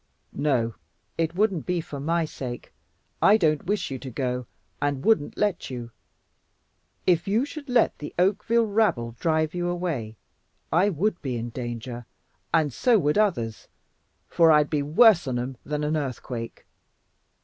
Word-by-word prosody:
"No, 125 -6 0 0.4
it 165 0 -1
wouldn't 195 -5 +1
be 180 -1 0
for 150 -3 -6
my 165 +3 0
sake. 125 -5 -7 0.5
I 210 - +6
don't 155 -6 +1
wish 200 -6 -1
you 130 - -4
to 135 - -7
go, 125 -1 -3 0.3
and 140 -2 -1
wouldn't 220 -10 +2
let 205 -3 0
you. 120 -2 -6 1.1
If 175 -1 +2
you 220 +7 +2
should 290 -1 -9
let 245 -2 +2
the 150 - -6
Oakville 210 +5 +2
rabble 200 - +1
drive 155 -2 +1
you 175 0 -2
away, 160 -12 -3 0.6
I 180 +5 +4
WOULD 190 +2 -1
be 130 -5 -3
in 115 +1 -5
danger, 120 0 -6 0.4
and 155 -5 +2
so 240 - +3
would 150 0 +2
others, 120 - 0 0.6
for 165 -1 +5
I'd 150 -1 +4
be 150 -2 +1
worse 170 - +5
on 125 -2 -1
'em 125 +1 -4
than 150 0 -3
an 150 +1 0
earthquake. 125 -4 -5
155 Hz, 155 wpm, -25 LUFS, 130-185 Hz, 1.1 s, I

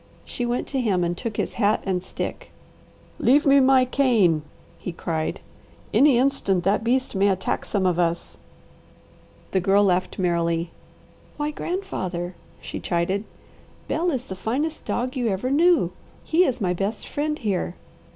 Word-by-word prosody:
She 245 - -3
went 240 +1 -1
to 270 -2 0
him 195 -7 +1
and 175 0 -1
took 220 +2 -5
his - - -1
hat 210 +1 +2
and 185 -2 0
stick. 185 - -6 0.7
"Leave 290 +6 +4
me 280 0 +6
my 260 -1 +5
cane," 230 - +3 0.4
he 180 - -5
cried. 160 -2 -3 0.5
"Any 275 -3 +5
instant 240 -9 +1
that 200 +4 +2
beast 255 +3 +1
may 200 0 +3
attack 190 -2 -1
some 195 -3 -1
of 180 -1 +2
us." 170 0 -1 1.1
The 190 - +2
Girl 195 +3 +4
laughed 185 -2 +1
merrily. 170 -2 0 0.7
"Why 295 0 -1
grandfather!" 185 - -4 0.3
she - - -6
chided, 185 +4 -1 0.6
"Bel 345 +2 0
is 265 -7 -1
the 190 - -7
finest 280 +11 -2
dog 255 +3 -2
you 245 -3 0
ever 215 +5 -1
knew, 340 +4 +4 0.3
he 345 +3 +3
is 255 -5 -1
my 180 -4 +1
best 200 +4 -3
friend 300 +1 -2
here. 190 - -2
210 Hz, 155 wpm, -24 LUFS, 180-265 Hz, 1.1 s, me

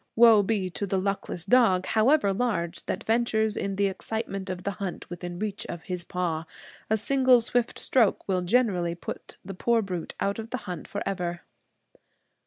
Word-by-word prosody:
Woe 230 -2 +8
be 195 -3 -1
to 175 +5 -3
the 195 - 0
luckless 190 -3 -2
dog, 200 -5 +4
however 220 -1 +3
large, 190 -6 -2
that - - -2
ventures 220 -2 +1
in 195 0 -2
the 200 +1 +2
excitement 195 0 -3
of 180 -1 -4
the 200 - -1
hunt 190 -3 -4
within 175 0 -6
reach 205 +1 -3
of 170 -2 -6
his 180 -2 -4
paw. 170 -2 -2 0.4
A 220 - +3
single 255 +3 +4
swift 235 +1 0
stroke 235 -6 +2
will 185 -2 +1
generally 180 -4 +1
put 170 - -8
the 195 - -6
poor 230 +4 +2
brute 180 -4 -5
out 200 +2 -1
of 225 0 -6
the 255 - -2
hunt 180 -3 -6
forever. 180 -4 -3
195 Hz, 175 wpm, -27 LUFS, 180-225 Hz, 0.4 s, Woe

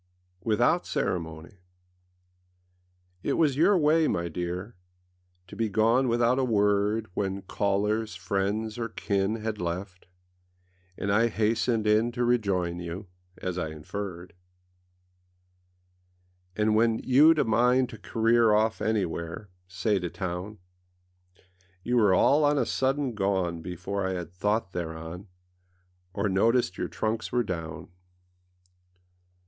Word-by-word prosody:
WITHOUT 120 +10 +2
CEREMONY 80 +1 -3 1.6
IT - - -1
was 150 -5 +2
your 180 +7 +4
way, 155 0 +3
my 85 0 -1
dear, 90 +6 -5 0.7
To 90 - -12
be 115 -1 -1
gone 115 +6 +3
without 120 +2 +2
a - - +2
word 105 -1 +2
When 95 0 -2
callers, 105 +3 -1
friends, 105 +3 -2
or 115 -1 -2
kin 100 0 -1
Had 110 -2 -4
left, 90 +2 -5 0.9
and 100 - -2
I 110 +3 +4
hastened 110 +1 0
in 110 +3 +3
To 120 +1 0
rejoin 95 -8 0
you, 90 +3 -7 0.3
as 90 0 -4
I 80 - -2
inferred. 90 +3 -7 2.2
And 105 0 +2
when 115 +1 +3
youâd 150 +5 +6
a - - +3
mind 125 +3 +3
to 110 - -10
career 115 0 +3
Off 110 +1 +1
anywhereâsay 90 0 -2
to 90 - -3
townâ 95 +4 -5 1.3
You 125 +1 +1
were 105 -5 +5
all 145 +10 +4
on 145 0 +3
a - - +2
sudden 135 -1 0
gone 95 -5 -1
Before 90 +3 -4
I 95 - -2
had 90 -2 -5
thought 105 +2 -1
thereon, 85 +2 -6 0.8
Or 100 +2 -1
noticed 100 +1 +1
your - - -1
trunks 110 +1 -3
were 120 -1 +2
down. 80 -6 -6
105 Hz, 120 wpm, -27 LUFS, 90-115 Hz, 2.2 s, youâd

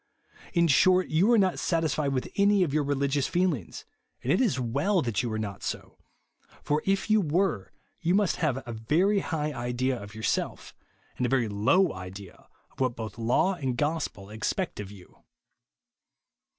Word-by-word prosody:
In 170 -2 +3
short, 185 +5 +4
you 180 +9 +3
are 235 - +6
not 190 -3 +2
satisfied 155 -4 0
^vith 130 -2 -2
any 200 -1 +4
of 150 -6 -2
your 155 -1 +2
rehgious 140 0 0
feehngs; 175 - -1 0.4
and 130 - 0
it - - +2
is 210 - +2
weU 140 - +1
that 115 -4 0
you 120 -2 -3
are 110 - -2
not 105 -3 -5
so; - - -6 0.6
for, 150 +1 0
if 195 0 +1
you 215 -1 +5
were, 165 - 0 0.3
you 175 +1 +1
must 205 -3 +2
have 135 -6 -1
a 120 - -4
very 165 - +2
high 150 -4 -2
idea 125 0 -2
of 105 +1 -10
yourself, 110 -4 -2 0.4
and 125 - 0
a - - -3
very 125 -3 +2
low 130 - +2
idea 95 +1 -10 0.2
of - - -22
what 130 -3 0
both 110 -1 -7
law 140 +11 +2
and 135 -8 -3
gospel 145 -10 -2
expect 110 - -3
of 100 -2 -6
you. 100 -3 -15
140 Hz, 175 wpm, -27 LUFS, 115-180 Hz, 0.6 s, are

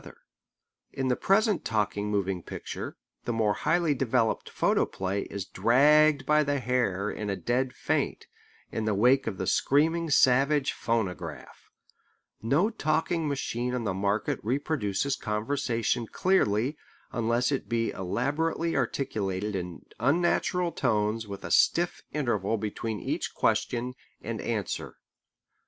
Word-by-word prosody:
Both - - -19
cannot - - -13
rule. - - -35 0.8
In 135 - +1
the 125 - +3
present 205 - +2
talking 105 -1 -1
moving 95 -3 -1
picture - - -7 0.3
the - - -1
more 110 -2 +2
highly 170 -2 +1
developed 115 -4 0
photoplay 95 +1 0
is 100 -2 -5
dragged 150 +3 +4
by 150 0 +4
the 145 -1 0
hair 115 -6 0
in 105 -1 -4
a 100 - 0
dead 125 +5 0
faint, - - -1 0.5
in 110 - -2
the 110 -2 +1
wake 125 +6 +4
of 100 -4 -3
the 95 - -2
screaming 160 - +2
savage 140 +1 +4
phonograph. 110 -5 -4 0.7
No 150 - +2
talking 160 -2 0
machine 125 -3 -2
on 125 - -2
the 100 -4 -1
market 100 +3 0
reproduces 135 -1 -1
conversation 115 +1 -1
clearly 140 - +1 0.3
unless 120 +3 +1
it 135 - -2
be 115 -1 0
elaborately 145 - -1
articulated 105 -6 -1
in 90 -2 -5
unnatural 175 +6 +1
tones 110 -4 0
with 100 -1 -7
a - - -5
stiff 175 +1 +3
interval 115 -7 0
between 110 +1 -4
each - - -3
question 125 +1 0 0.3
and - - -5
answer. - - -3
120 Hz, 135 wpm, -28 LUFS, 105-145 Hz, 0.8 s, dragged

